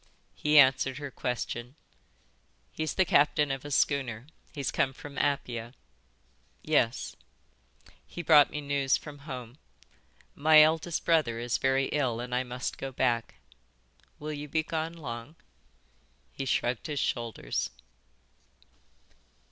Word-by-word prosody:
He 150 0 +2
answered 135 -1 +5
her 145 -1 -6
question. 125 +1 -4 1.0
"He's 155 0 -3
the 190 - +3
captain 145 -2 +3
of 135 -1 -4
a 145 - -7
schooner. 130 -5 0 0.3
He's 140 -3 -3
come 135 - +1
from 145 +1 -10
Apia." 120 -4 -2 0.9
"Yes." 115 +2 +1 0.9
"He 175 - -7
brought 150 -2 +7
me 150 - -5
news 140 -2 +1
from 145 -2 -11
home. 125 0 -7 0.7
My 155 +1 +7
eldest 160 +2 0
brother 155 -9 +2
is 120 0 -1
very 135 0 +2
ill 130 -6 0
and 125 +1 -5
I 125 - +2
must 125 0 -5
go 135 - -4
back." 120 -3 0 0.8
"Will 150 +1 -5
you 145 0 -6
be 155 +2 0
gone 160 +1 -3
long?" 130 -2 -7 1.0
He 135 - -4
shrugged 120 -2 0
his 145 -2 -2
shoulders. 115 - -2
135 Hz, 125 wpm, -29 LUFS, 125-150 Hz, 1.0 s, brought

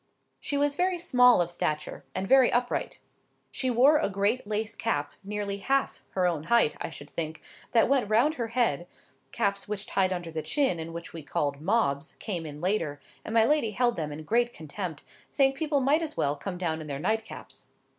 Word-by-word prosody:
She 285 - -2
was 290 0 +2
very 360 +4 +1
small 250 - +5
of 175 0 -1
stature, 155 -3 -3
and 190 +1 -2
very 265 0 +6
upright. 245 +1 -1 0.5
She 260 - -1
wore 265 +6 +5
a - - 0
great 200 +4 0
lace 215 +1 -2
cap, 145 -10 -2
nearly 200 0 -3
half 270 +7 0
her 185 -1 +2
own 165 -3 0
height, 230 -7 +3
I - - -3
should 145 -2 -9
think, 160 0 -4 0.3
that 230 -2 +4
went 260 -5 +2
round 235 +8 +4
her 240 -6 -3
head 225 - 0 0.4
(caps 200 -3 0
which 210 0 -4
tied 190 -2 +1
under 175 -2 -4
the 160 0 -3
chin, 265 - +1
and 160 +1 -5
which 170 0 -8
we 165 - -6
called 145 -1 -2
"mobs," 160 -6 0
came 175 -6 -4
in 150 0 -8
later, 165 -5 -1 0.2
and - - -6
my 225 -1 +6
lady 295 -3 +2
held 240 +3 +1
them 155 -4 -3
in 150 +2 -7
great 235 +7 +1
contempt, 160 0 -6 0.3
saying 270 -1 +3
people 290 0 0
might 285 +5 +3
as 315 -2 -5
well 140 +1 +1
come 180 +5 -5
down 160 -3 -2
in 155 - -7
their 140 -2 -3
nightcaps). 220 +7 -4
200 Hz, 200 wpm, -28 LUFS, 160-245 Hz, 0.5 s, very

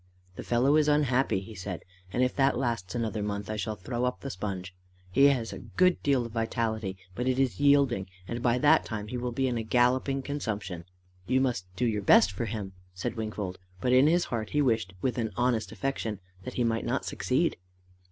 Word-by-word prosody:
"The - - -6
fellow 130 +5 +3
is 150 -1 +3
unhappy," 135 -8 +2
he 110 +3 -10
said, 95 -3 -6 0.3
"and 125 - +1
if 125 - 0
that 135 -2 +3
lasts 115 -8 -2
another 115 -2 -1
month, 105 0 -3
I - - -2
shall 105 +1 -2
throw 120 +6 -4
up 125 - -2
the 135 - -4
sponge. 95 -1 -5 0.4
He 135 +9 +5
has 130 -5 +2
a - - -7
good 180 0 +2
deal 135 -4 +2
of 115 - -7
vitality, 110 -3 -2 0.2
but 125 +6 -3
it 130 0 +2
is 135 -2 +1
yielding, 140 -8 +4 0.2
and 120 0 -4
by 120 0 +2
that - - +5
time 105 -2 -5
he 125 - -3
will 125 0 -2
be 130 +2 0
in 120 -2 -1
a - - -2
galloping 125 +4 +2
consumption." 105 - -4 0.4
"You 130 - +3
must 120 -9 0
do 125 - 0
your 105 -3 0
best 100 0 +6
for 100 +5 -3
him," 105 -3 -5 0.2
said 95 - -3
Wingfold, 105 -4 -4 0.2
but 125 +5 +1
in 130 +3 +6
his 175 +2 +3
heart 110 -3 -3
he 150 - 0
wished, 110 -7 +1
with 130 -1 0
an 110 -1 0
honest 120 -2 +1
affection, 115 -7 -3 0.3
that 125 - -6
he 125 - +1
might 115 -1 0
not - - -1
succeed. - - 0
120 Hz, 210 wpm, -29 LUFS, 105-130 Hz, 0.4 s, best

